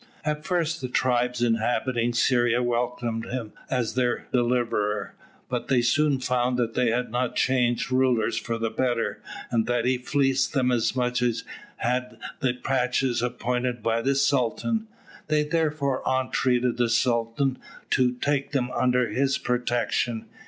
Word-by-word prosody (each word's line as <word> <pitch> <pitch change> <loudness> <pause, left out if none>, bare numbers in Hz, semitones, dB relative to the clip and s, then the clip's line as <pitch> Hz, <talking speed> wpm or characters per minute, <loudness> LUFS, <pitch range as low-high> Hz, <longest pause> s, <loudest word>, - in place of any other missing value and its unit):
At 150 0 -1
first 165 -2 0
the 130 - -2
tribes 125 -1 +1
inhabiting 120 +1 +1
Syria 120 0 +2
welcomed 120 -1 -1
him 120 -4 -5 0.2
as 125 -4 -1
their 125 -1 0
deliverer, 120 -4 0 0.3
but 125 -1 -3
they 130 -3 +3
soon 140 +3 +2
found 125 0 0
that 115 -2 0
they 125 -2 +2
had 120 0 -1
not 125 0 -1
changed 125 -1 +1
rulers 130 -4 +2
for 115 -1 -2
the 115 -1 -2
better, 120 0 -1 0.3
and 115 -2 +1
that 120 -1 0
he 125 0 +2
fleeced 135 0 +1
them 130 -3 +2
as 120 0 +1
much 125 -1 0
as 115 -2 0 0.3
had 125 0 -2 0.2
the 130 -4 0
pachas 125 -1 0
appointed 125 -1 -2
by 115 0 +1
the 135 +3 +1
Sultan. 140 - +1 0.4
They 150 -1 +2
therefore 150 -4 0
entreated 125 -1 +1
the 120 -1 +2
Sultan 120 +3 +1 0.3
to 125 -2 +3
take 140 +3 -1
them 125 -3 0
under 125 -1 +2
his 135 +5 +1
protection. 120 -1 -1
125 Hz, 145 wpm, -25 LUFS, 120-130 Hz, 0.4 s, they